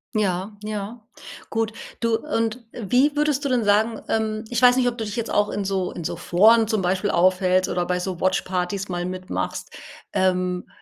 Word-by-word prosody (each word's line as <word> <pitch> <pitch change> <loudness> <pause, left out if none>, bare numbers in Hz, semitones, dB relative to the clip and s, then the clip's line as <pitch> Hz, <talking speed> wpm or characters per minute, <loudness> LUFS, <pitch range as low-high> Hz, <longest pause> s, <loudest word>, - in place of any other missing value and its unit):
Ja, 200 0 -1
ja, 215 +2 -5 0.5
gut. 225 -1 -1 0.3
Du 230 -1 +2
und 230 -3 -2
wie 250 +7 +2
würdest 295 -1 +1
du 280 - +1
denn 250 -2 +2
sagen 215 +2 +2
ähm, 220 -1 -1
ich 240 -1 -1
weiß 250 0 +7
nicht, 250 -1 +3
ob 240 - -8
du 225 - -3
dich 210 - -5
jetzt 230 -2 -3
auch 205 0 +2
in 205 - -2
so 190 -2 -1
in 170 - -6
so - - -3
Foren 220 +5 +4
zum 220 -2 0
Beispiel 185 +3 0
aufhältst 185 +1 +3
oder 175 0 0
bei 180 - 0
so 180 -1 -4
Watchpartys 185 +1 -1
mal 175 -1 -2
mitmachst. 185 +1 -4 0.4
Ähm, 180 -1 0
205 Hz, 190 wpm, -23 LUFS, 185-230 Hz, 0.5 s, weiß